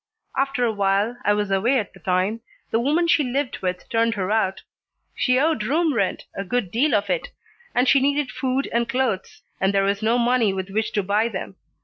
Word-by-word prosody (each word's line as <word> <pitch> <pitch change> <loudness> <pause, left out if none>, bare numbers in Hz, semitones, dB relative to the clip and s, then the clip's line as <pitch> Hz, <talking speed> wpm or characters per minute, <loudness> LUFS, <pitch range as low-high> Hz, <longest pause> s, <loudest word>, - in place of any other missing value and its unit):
After 270 -2 +1
a 230 - +1
while 200 +2 +1
I 205 - +3
was 205 -1 -1
away 230 +8 +2
at 210 -5 -3
the 190 - -16
time 185 +6 0 0.3
the 225 - +2
woman 305 +8 +2
she 320 -3 +4
lived 265 +1 -2
with 180 -1 -3
turned 230 0 +1
her 190 0 -2
out. 195 -3 0 0.5
She 255 -1 +2
owed 310 -3 +2
room 310 +6 +1
rent, 200 -6 -1
a 195 - -4
good 210 -2 -2
deal 250 +2 +2
of 205 - +1
it, - - -1 0.5
and 250 +2 +3
she 275 - +6
needed 285 0 +1
food 265 +1 -1
and 235 0 +1
clothes, 250 -8 -2 0.2
and 190 +1 +2
there 195 -1 +2
was 200 +1 0
no 225 +2 +2
money 240 -4 +2
with 190 0 -5
which 220 +2 -1
to 205 - +1
buy 205 +4 +1
them. 190 -2 -6
225 Hz, 215 wpm, -23 LUFS, 195-260 Hz, 0.5 s, she